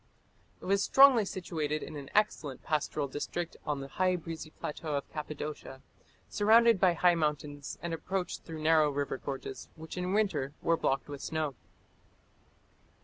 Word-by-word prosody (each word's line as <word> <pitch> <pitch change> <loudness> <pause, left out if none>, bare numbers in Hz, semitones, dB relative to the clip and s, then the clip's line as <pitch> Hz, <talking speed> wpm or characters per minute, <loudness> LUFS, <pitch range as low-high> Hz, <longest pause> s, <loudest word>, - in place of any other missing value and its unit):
It - - -11
was 195 +1 +2
strongly 270 -5 +7
situated 155 -5 -3
in - - -8
an 140 -2 -7
excellent 150 -10 +1
pastoral 150 -1 -1
district 165 +5 -4
on 145 -2 -1
the 135 - -6
high, 185 +5 +1
breezy 165 -2 -6
plateau 155 0 -5
of 140 - -3
Cappadocia, 150 -3 -6 0.4
surrounded 225 0 +5
by 185 -2 +5
high 175 +1 +4
mountains, 150 -3 -2
and 170 -1 -2
approached 180 +2 -3
through 160 -2 -8
narrow 155 -1 +5
river 140 -2 -2
gorges, 135 -1 -6
which 160 +2 -9
in 180 +1 -2
winter 160 -10 0
were 165 - +3
blocked 135 -4 0
with 145 -1 -7
snow. 155 -3 -2
155 Hz, 150 wpm, -31 LUFS, 145-180 Hz, 0.4 s, strongly